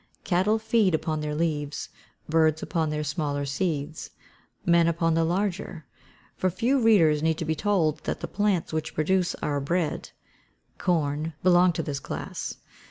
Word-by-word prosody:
Cattle 190 +4 +2
feed 220 -5 +2
upon 155 -1 -2
their 150 0 -3
leaves; 150 -3 -2 0.4
birds 160 -1 +2
upon 160 -3 -1
their 150 0 -2
smaller 145 -1 -2
seeds; 145 +1 -3 0.6
men 170 -1 +4
upon 165 0 +1
the 165 0 +2
larger; 180 -1 -2 0.5
for, 185 - +1
few 240 +9 +1
readers 165 -10 +5
need 160 0 0
be 160 - 0
told 165 -3 +1
that - - -2
the - - -4
plants 200 -5 0
which 155 -1 -3
produce 180 +3 +1
our 145 -1 0
bread 160 +3 -1 0.7
corn, 155 -2 0
belong 180 0 +5
to - - -2
this 140 -2 -3
class. - - -5
165 Hz, 150 wpm, -26 LUFS, 150-185 Hz, 0.7 s, readers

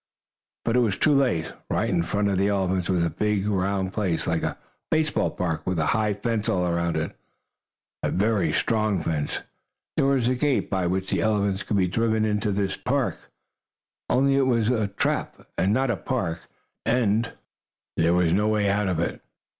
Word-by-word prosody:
But 115 - +1
it - - +5
was 110 -5 +1
too 150 - +3
late. 120 - +1 0.2
Right - - +1
in 85 - +2
front 100 +4 0
of 95 -2 +1
the 100 - +3
elephants 95 -2 0
was 90 -2 +2
a 85 - +1
big 105 -1 0
round 95 -1 0
place, 95 -6 -1
like - - 0
a - - -2 0.3
baseball 155 -1 +1
park, 80 -4 -3
with 90 -1 0
a 80 - +1
high 105 -2 +1
fence 110 +1 -1
all 90 -1 +1
around 85 -1 0
it 80 - -3 0.9
a - - 0
very 105 +1 +1
strong 110 -4 +1
fence. 75 -3 -2 0.5
There 135 - +2
was 135 -4 +2
a 130 - +3
gate 135 -1 0
by 95 -3 +1
which 95 +2 -2
the - - +1
elephants 100 -2 +1
could 105 - -1
be 95 -2 +3
driven 110 +3 +1
into 105 -1 0
this 100 0 -1
park, - - -2 0.8
only 135 +2 +3
it 135 -1 +3
was 115 -2 +2
a 110 -4 +1
trap, 100 0 -2
and 90 +4 +1
not 130 +3 +2
a 110 - -1
park. 85 0 -3 0.4
And 115 -1 +1 0.6
there 85 +1 +3
was 90 -2 +3
no 105 +3 +2
way 105 -2 +2
out 105 0 +1
of 90 -3 0
it. 85 - -2
100 Hz, 190 wpm, -25 LUFS, 90-115 Hz, 0.9 s, it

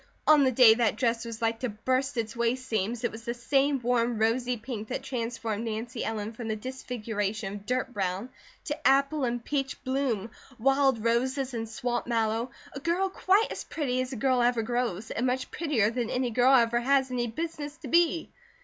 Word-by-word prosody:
On 305 -2 +6
the 260 - +3
day 235 -2 +8
that 225 -2 +1
dress 230 -1 0
was 230 0 -6
like 225 0 +1
to 250 - -2
burst 255 +5 -1
its 225 0 -2
waist 235 +2 0
seams, 225 +1 -1
it 240 - 0
was 225 +1 -9
the 235 +1 -3
same 275 +3 +2
warm 240 -1 +1
rosy 240 +3 +1
pink 220 -2 -6
that 260 +2 -4
transformed 230 -4 -3
Nancy 230 +2 -4
Ellen 220 0 -3
from 230 0 -6
the 220 - -1
disfiguration 215 -4 -4
of 205 0 -8
dirt 255 0 -1
brown 195 +3 -2 0.3
to 295 -4 -1
apple 275 +1 +3
and 240 -1 -2
peach 275 -2 -2
bloom, 255 -5 -1 0.3
wild 270 -1 +3
roses 260 +3 0
and 225 -1 -4
swamp 240 +1 -2
mallow, 230 0 0 0.2
a 275 - -5
girl 350 +6 0
quite 390 +3 +2
as - - -5
pretty 255 -5 -1
as 255 +1 -4
a - - -4
girl 255 +1 +2
ever 240 -1 +2
grows, 235 -3 -2
and 245 +3 0
much 255 +1 -2
prettier 260 -10 +1
than 235 -1 -2
any 250 -1 -1
girl 250 +4 +5
ever 235 -1 +4
has 265 +1 +2
any 240 -1 -1
business 295 +3 -5
to - - -9
be. 335 -1 +2
245 Hz, 195 wpm, -28 LUFS, 225-265 Hz, 0.3 s, day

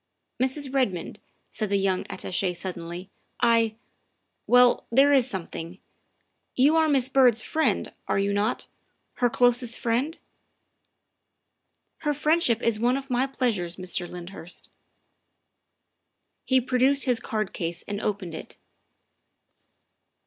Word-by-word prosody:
" - - -52
Mrs. 265 +1 0
Redmond," 205 -8 -1 0.3
said 215 -2 -3
the 200 - +2
young 190 -1 0
Attache 185 -1 -2
suddenly, 175 0 -7 0.2
" - - -46
I 230 -2 +3 0.7
well, 245 0 +4
there 275 +4 +5
is 265 -2 +3
something 170 -4 -6
else. - - -20 0.8
You 285 +5 +4
are 320 -1 +3
Miss 265 -3 +3
Byrd's 250 -4 +4
friend, 315 0 0
are - - 0
you 200 +1 0
not 205 +4 -1 0.5
her 245 - +2
closest 245 0 +3
friend?" 250 +7 -1 0.9
" - - -49
Her 295 -1 -1
friendship 300 -6 +2
is 230 -2 +1
one 245 +3 +2
of 275 -1 -8
my 250 +2 +1
pleasures, 220 -10 -2
Mr. 180 -1 -1
Lynd 180 +1 -8
hurst." 175 -2 -9 1.7
He 260 0 +3
produced 260 +3 +2
his 250 -3 +2
card 215 -3 -3
case 170 0 -4
and 205 0 -4
opened 195 -5 -3
it. 160 - -9
235 Hz, 135 wpm, -25 LUFS, 190-265 Hz, 1.7 s, there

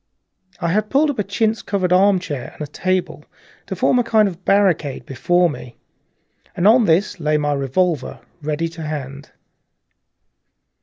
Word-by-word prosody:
I 170 - -1
had 210 +4 0
pulled 290 +2 +3
up 255 - -8
a - - +1
chintz 215 +2 -1
covered 185 -3 -1
armchair 180 -8 +1
and - - -13
a 145 - -9
table 185 +2 -2 0.4
to - - -4
form 250 - +2
a - - +2
kind 220 -3 +3
of 185 -1 -8
barricade 180 -9 +1
before 175 +7 +1
me. 125 -5 -8 0.8
On 220 +6 +5
this 175 +3 +1
lay 150 -1 +1
my 145 -1 0
revolver, 145 +4 -1 0.2
ready 155 +2 -2
to 165 0 -10
hand. 145 -3 -6
175 Hz, 150 wpm, -20 LUFS, 150-200 Hz, 0.8 s, On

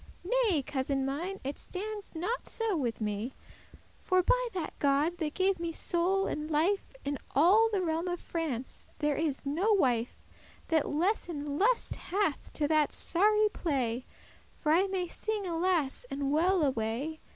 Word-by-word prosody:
"Nay, 410 - +2
cousin 270 -1 -1
mine, 340 +9 -3
it 275 +2 -4
stands 410 0 -5
not 400 +10 -2
so 450 -4 -1
with 240 -8 -2
me; 210 +4 -2 0.7
For 370 -1 +2
by - - +2
that 340 -4 -3
God, 290 +5 +2
that 310 -2 -2
gave 380 -1 +2
me 340 -1 -2
soul 360 +4 +1
and 300 +1 -3
life, 345 +10 +1
In 280 0 -2 0.2
all 390 +10 +6
the 395 -3 0
realm 330 +1 -1
of 350 -1 -2
France 290 -7 -4
is 300 -1 0
there 280 - -1
no 395 +8 +3
wife 245 - +1 0.5
That 320 -3 +2
lesse 350 +6 0
lust 310 +10 +1
hath 385 -5 -1
to 295 - 0
that 310 -2 +3
sorry 425 +4 +3
play; 255 - -2 0.5
For 305 - 0
I 365 +5 +4
may 375 -2 -2
sing 430 +3 -3
alas 335 -4 0
and 275 0 -2
well 345 +3 +3
away! 260 +4 -1
330 Hz, 155 wpm, -30 LUFS, 285-385 Hz, 0.7 s, all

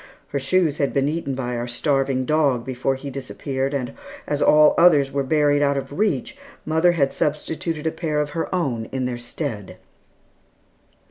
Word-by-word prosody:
Her 140 - -2
shoes 155 +2 +1
had 140 -2 0
been 140 0 +2
eaten 150 -3 -2
by 125 -2 -3
our 120 +1 -3
starving 135 +1 0
dog 140 -5 +1
before 130 +1 -1
he 140 +1 -7
disappeared, 135 0 -3
and 125 -3 -3 0.3
as 145 0 -2
all 150 0 +6
others 150 -6 +5
were 140 - 0
buried 145 +1 +2
out 140 -1 +2
of 140 +3 -5
reach, 200 - 0 0.3
mother 160 +3 +3
had 140 -5 +1
substituted 155 +1 -2
a 160 - +1
pair 155 -3 -2
of 150 0 -1
her 165 +1 -3
own 130 -11 -1
in 130 +2 -3
their 125 -1 -3
stead. 120 - -5
140 Hz, 175 wpm, -22 LUFS, 130-155 Hz, 0.3 s, all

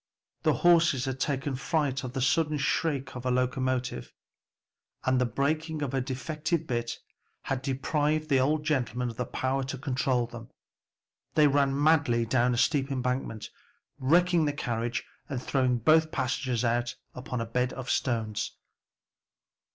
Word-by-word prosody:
The - - +3
horses 165 -7 +5
had 130 -1 -3
taken 140 -1 -1
fright 140 0 -1
at 125 +1 -6
the 130 - 0
sudden 155 +1 +2
shriek 140 -2 -1
of 125 - -6
a 130 - 0
locomotive, 125 - -1 0.9
and 130 -1 +2
the 125 - +2
breaking 155 +5 -1
of 135 - -3
a 135 - +1
defective 155 +6 -2
bit 120 -3 -2 0.5
had 135 -1 -2
deprived 150 +3 0
the 135 -3 +3
old 150 +4 +1
gentleman 125 -5 -1
of 115 - -14
the 125 - -2
power 135 +1 -1
to 135 +1 -4
control 130 -2 0
them. 120 -1 -10 0.9
They 150 - +6
ran 140 -1 +2
madly 145 -6 +3
down 120 +1 +2
a - - -2
steep 140 +2 +2
embankment, 125 -4 -2 0.5
wrecking 170 +4 +3
the 145 - 0
carriage 120 -2 -2 0.2
and 135 - -2
throwing 130 -1 +1
both 155 +6 +4
passengers 125 -4 -1
out 120 +1 0 0.2
upon 125 -1 -5
a 115 - -2
bed 125 +2 0
of 130 -2 -4
stones. 110 -4 -1
130 Hz, 150 wpm, -28 LUFS, 125-150 Hz, 0.9 s, They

